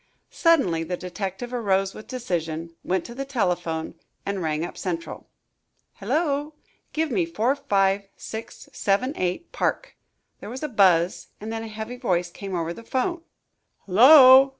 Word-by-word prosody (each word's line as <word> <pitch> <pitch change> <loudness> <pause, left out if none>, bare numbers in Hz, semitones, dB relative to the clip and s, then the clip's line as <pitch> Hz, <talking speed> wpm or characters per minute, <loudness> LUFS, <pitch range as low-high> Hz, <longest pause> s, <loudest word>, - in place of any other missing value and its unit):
Suddenly 275 - +3
the 180 +2 -3
detective 195 +6 -5
arose 195 -5 +1
with 215 - -11
decision, 165 -9 -3
went 185 -1 -1
to 235 - -8
the 270 +3 -4
telephone, 175 -11 -1 0.3
and 200 -1 -2
rang 155 0 -1
up - - -8
Central. 170 -3 -5 0.7
"Hullo!" 300 -1 -1 0.4
"Give 315 -1 -1
me 195 -7 +2
45678 200 - -1
Park." - - -2 0.4
There - - -8
was 255 +5 -6
a 305 - -2
buzz 185 -6 +3
and 220 +2 -5
then 225 - -3
a 225 - -6
heavy 220 +3 -6
voice 180 -8 0
came 195 0 -6
over 170 0 -2
the 230 - -10
'phone. 270 +9 -2 0.6
"Hullo!" 260 +6 +9
200 Hz, 135 wpm, -24 LUFS, 180-255 Hz, 0.7 s, Hullo